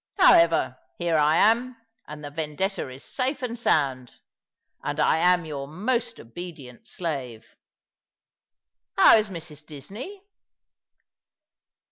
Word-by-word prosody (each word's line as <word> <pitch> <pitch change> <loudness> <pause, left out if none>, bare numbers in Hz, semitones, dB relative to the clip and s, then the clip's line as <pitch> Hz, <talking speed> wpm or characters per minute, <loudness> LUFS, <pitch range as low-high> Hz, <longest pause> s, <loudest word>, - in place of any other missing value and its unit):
However, 165 - +5 0.2
here 170 -1 0
I 155 0 +4
am, 235 +5 +3 0.3
and 150 0 -9
the 145 - -7
Vendetta 160 +3 -3
is 130 +1 -10
safe 265 +1 -3
and 240 -1 -4
sound; 135 - 0 0.7
and - - -3
I - - +3
am 180 0 +3
your 140 -3 -5
most 225 - -2
obedient 140 -1 -10
slave. 125 -10 -5 1.4
How - - +8
is 215 -1 0
Mrs. 160 -4 -8
Disney?" 200 - -9
165 Hz, 110 wpm, -25 LUFS, 145-215 Hz, 1.4 s, How